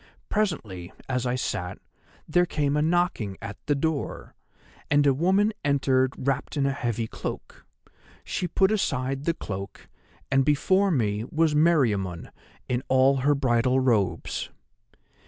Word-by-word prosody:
"Presently, 110 - -2 0.2
as 125 -1 -1
I 125 - 0
sat, 95 -7 -3 0.5
there 175 +3 +3
came 145 -3 0
a 150 - +2
knocking 160 - 0
at 100 -1 -7
the 145 - +2
door, 155 0 -3 0.6
and 145 -1 +4
a 140 - +5
woman 190 +9 +2
entered 135 -2 +2
wrapped 135 +3 -2
in 140 - +2
a 140 - +2
heavy 120 -4 -2
cloak. - - -7 0.6
She 180 - -2
put 190 +4 +2
aside 135 -9 -1
the 170 - +1
cloak, 100 - -7 0.4
and 135 0 +4
before 185 +8 +3
me 110 - 0
was 160 -1 +2
Meriamun 115 - +1 0.4
in 125 0 -1
all 130 +1 +4
her 145 +3 +2
bridal 130 -1 +2
robes. 115 -7 0
135 Hz, 135 wpm, -26 LUFS, 120-155 Hz, 0.6 s, a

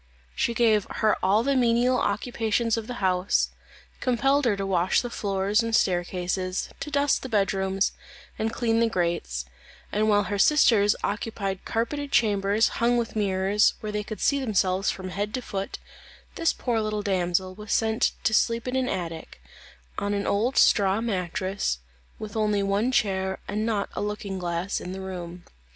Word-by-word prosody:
She 235 - 0
gave 220 -3 +3
her 215 -1 +1
all 200 +4 +3
the 275 +2 +1
menial 245 0 +3
occupations 225 +1 0
of 225 -1 -5
the 245 - -5
house; 185 +1 +1 0.5
compelled 270 +3 +2
her 210 -4 +2
to 195 - -2
wash 185 -1 +2
the 245 - -6
floors 200 +1 0
and 230 -1 0
staircases, 185 0 0
to - - -5
dust 285 -1 +2
the 260 - -6
bed 205 -3 +2
rooms, 190 0 0 0.5
and 220 +1 0
clean 230 -1 +1
the 230 0 +3
grates; 170 - -1 0.5
and 215 +1 +1
while 205 -1 +4
her 200 +1 -3
sisters 220 -6 +5
occupied 200 -2 -3
carpeted 280 +5 -2
chambers 205 -1 +3
hung 240 +1 +3
with 230 -1 -2
mirrors, 200 0 +2
where 215 - -4
they 210 0 -2
could 215 +1 -7
see 280 - +2
themselves 195 -5 +1
from 190 -1 -4
head 205 +4 -3
to 255 - -3
foot, 195 -3 -4 0.6
this 330 -1 +1
poor 235 -3 -1
little 215 -1 -2
damsel 185 -1 0
was 210 +2 -9
sent 220 0 +2
to 220 - +2
sleep 230 +2 +2
in 250 - -2
an 260 -1 0
attic, 165 - -5 0.6
on 205 0 -1
an 200 - -2
old 225 +6 0
straw 195 0 +4
mattress, 190 - -2 0.4
with 215 -1 -8
only 210 -2 +1
one 200 +5 +1
chair 190 -5 0
and 215 +2 -2
not 210 -3 0
a - - -3
looking 205 -2 -4
glass 175 +2 -2
in 180 - -6
the 190 - -6
room. 180 -2 -7
205 Hz, 170 wpm, -26 LUFS, 190-230 Hz, 0.6 s, sisters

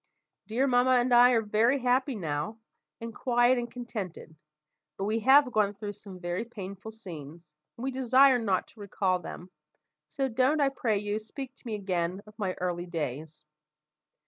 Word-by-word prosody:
"Dear 235 +5 +1
mamma 255 0 +4
and 245 +1 +1
I 245 +1 +8
are 225 -2 +2
very 220 +5 +2
happy 255 +1 +1
now, 160 +2 -3 0.4
and 230 0 -7
quiet 245 +1 +3
and 240 0 -4
contented: 215 -9 -7 0.6
but 195 - -3
we 220 +2 0
have 265 +3 +5
gone 210 -3 +1
through 205 0 -6
some 200 -2 -11
very 175 +3 -3
painful 200 -3 -8
scenes, 170 -7 -10 0.2
and 235 - -8
we 265 - -1
desire 260 0 +5
not 200 -5 0
to 225 - -20
recall 190 -2 0
them; 180 +1 -9 0.6
so 270 -1 -2
don't, 260 +5 +2
I 280 -1 +4
pray 230 -6 0
you, 205 +1 -2
speak 260 +4 -8
to - - -14
me 220 - -2
again 185 -1 -2
of 210 - -15
my 190 -3 -1
early 180 -1 -3
days." 155 -1 -5
215 Hz, 170 wpm, -29 LUFS, 185-250 Hz, 0.6 s, I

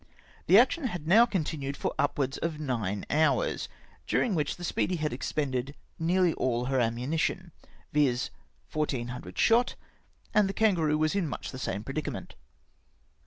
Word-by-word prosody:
The 185 - +7
action 265 +6 +4
had 175 -10 -4
now 225 +7 +7
continued 150 - -2
for - - -2
upwards 140 -1 0
of 165 -2 -2
nine 110 -9 -2
hours; 160 - +1 0.4
during 230 - +1
which 150 -5 0
the 175 - -10
Speedy 180 +1 0
had 155 -4 -2
expended 135 0 -2 0.2
nearly 175 +1 +3
all 125 -1 0
her 135 0 +1
ammunition, 125 +7 -1 0.4
viz. 135 -5 +2 0.4
1400 125 -5 -3
shot, 235 +2 +3 0.6
and 210 -2 +4
the - - -2
Kan 220 -1 +3
garoo 155 -3 +1
was 155 +3 +1
much 165 -10 -2
in - - -7
the 130 - -7
same 105 -4 -3
predicament. 140 +5 -5
150 Hz, 150 wpm, -29 LUFS, 130-180 Hz, 0.6 s, The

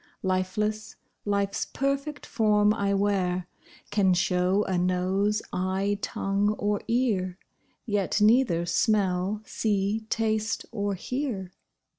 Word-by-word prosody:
Lifeless, 210 +3 -1 0.3
life's 200 -1 0
perfect 275 +2 -2
form 210 -2 +3
I 200 -2 0
wear, 185 -3 0 0.5
Can 195 -3 +3
show 180 +2 +2
a 190 - -2
nose, 185 +4 +1
eye, 190 +2 0
tongue, 200 +1 0
or 205 0 0
ear, 205 -7 0 0.5
Yet 205 -3 0
neither 210 -6 +4
smell, 195 +1 +1
see, 210 0 -1
taste, 220 -1 0
or 205 -3 -1
hear. 220 -4 -3
205 Hz, 105 wpm, -27 LUFS, 185-215 Hz, 0.5 s, neither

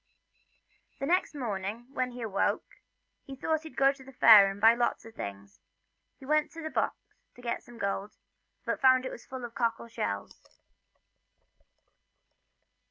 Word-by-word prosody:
Next 330 +3 +1
morning, 215 -3 -4
when 255 -2 -1
he 245 -1 -7
awoke, 200 -3 0 0.6
he 270 - -7
thought 315 +3 -1
he'd 315 -1 -11
go 275 0 +5
to 275 -1 -13
the 270 - -13
fair 215 -6 +8
and 195 +1 -7
buy 225 +2 +7
a - - -4
lot 240 -1 -1
of 225 - -12
things, 100 - -8
and - - -51
he 265 - -13
went 305 +2 +2
to 330 0 -8
the 315 - -4
box - - 0 0.4
to 245 - -14
get 235 - -2
some 240 - -15
of 230 - -11
the - - +1
gold, 200 +1 -3 0.5
but - - -2
found 260 -1 +5
it - - -4
full 260 -2 -7
of 235 - -9
cockle 235 -1 -1
shells. 100 - -4
240 Hz, 170 wpm, -29 LUFS, 210-270 Hz, 0.6 s, fair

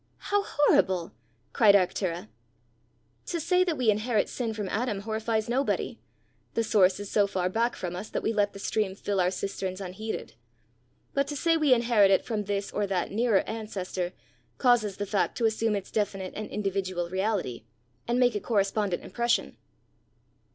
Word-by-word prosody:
"How 410 0 0
horrible!" 185 - +2 0.4
cried 210 -3 +6
Arctura. 180 - 0 1.0
"To 340 - -2
say 360 +3 +3
that 340 -4 -1
we 235 -4 +4
inherit 215 +1 0
sin 235 -3 -2
from 210 -2 -4
Adam, 210 -2 -1
horrifies 220 +1 -1
nobody: 260 +4 -1 0.6
the 230 - +2
source 195 -4 +3
is 205 -1 -6
so 205 -1 +3
far 185 -2 -1
back 230 +5 0
from 180 -1 -4
us, 190 +4 -6
that - - -3
we 225 - +1
let 205 -1 +1
the - - -9
stream 200 -1 -1
fill 200 -1 -1
our 180 - +3
cisterns 190 0 -4
unheeded; 195 - -5 0.8
but 275 0 +1
to 290 - -4
say 330 +3 +2
we 305 -4 +2
inherit 235 -5 +5
it 190 - +3
from 215 -3 -2
this 200 0 -2
or 205 -1 -1
that 190 -2 -1
nearer 220 -1 +3
ancestor, 195 -5 -4 0.5
causes 230 -6 +3
the 205 - -2
fact 200 -1 0
to 235 - +1
assume 220 0 +1
its 195 -2 -5
definite 195 -3 -2
and 215 - -5
individual 190 -3 -2
reality, 190 - -1 0.4
and 240 +1 +1
make 245 -1 +4
a 210 - -1
correspondent 200 -3 0
impression." 235 0 0
210 Hz, 170 wpm, -28 LUFS, 190-230 Hz, 1.0 s, cried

